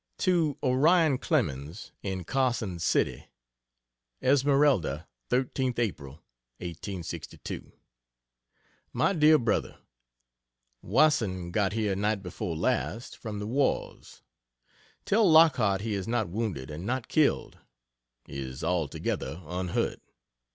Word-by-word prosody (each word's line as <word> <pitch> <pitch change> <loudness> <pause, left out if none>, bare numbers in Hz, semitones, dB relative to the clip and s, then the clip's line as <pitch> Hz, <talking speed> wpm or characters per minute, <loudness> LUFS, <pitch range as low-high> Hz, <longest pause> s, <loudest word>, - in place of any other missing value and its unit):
To 165 -6 +1
Orion 145 +2 +4
Clemens, 70 - -2
in 95 -2 -3
Carson 120 -6 -1
City: 65 -6 0 1.0
ESMERALDA, 135 - +3 0.2
13th 130 0 0
April, 85 - -2 0.4
1862. 90 +1 -7 1.2
MY - - +2
DEAR 155 -2 +6
BROTHER, 115 -6 -1 1.0
Wasson 100 - +2
got 100 0 +1
here 105 -3 0
night 105 0 0
before 90 -2 -4
last 120 +4 -1
"from 110 -3 -6
the 105 - -4
wars." 135 +6 -2 0.8
Tell 210 -1 +4
Lockhart 130 -12 +5
he 110 0 -2
is 100 0 -3
not 115 -5 0
wounded 90 - -3
and 75 +4 -6
not 125 +3 -2
killed 155 -3 +1 0.7
is 65 0 -6
altogether 80 -1 -2
unhurt. 90 +2 -2
110 Hz, 100 wpm, -28 LUFS, 90-135 Hz, 1.2 s, DEAR